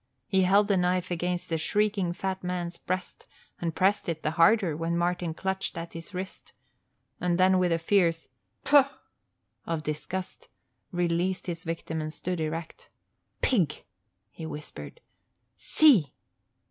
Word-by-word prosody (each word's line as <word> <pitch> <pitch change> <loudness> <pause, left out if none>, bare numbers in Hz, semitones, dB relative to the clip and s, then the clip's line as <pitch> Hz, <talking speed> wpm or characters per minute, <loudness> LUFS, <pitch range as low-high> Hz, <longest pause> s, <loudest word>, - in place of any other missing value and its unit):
He 190 +5 +2
held 200 +3 +4
the 200 -2 +3
knife 180 0 +1
against 175 +1 -2
the 165 -1 0
shrieking 205 0 +1
fat 190 +1 -3
man's 180 -1 -3
breast 185 +1 -5 0.3
and 165 -2 -2
pressed 195 0 +2
it 160 -2 -3
the 155 - +1
harder 170 0 +4
when 165 +2 -1
Martin 175 -1 -1
clutched 190 0 -2
at 165 0 -6
his 165 +3 -9
wrist, 185 0 -7 0.7
then 185 +1 +3
with 180 -1 +2
a 165 - +3
fierce 165 -1 +2 0.4
"Pfaw!" 285 -1 +6 0.8
of 165 -2 -2
disgust 185 - -5 0.4
released 175 +1 0
his 170 -1 -4
victim 160 -1 -3
and 155 0 -4
stood 180 +2 -4
erect. 160 +1 -5 0.5
"Pig!" 190 - +1 0.5
he - - -10
whispered. 150 - -8 0.5
"See!" 230 - +4
180 Hz, 135 wpm, -28 LUFS, 165-190 Hz, 0.8 s, Pfaw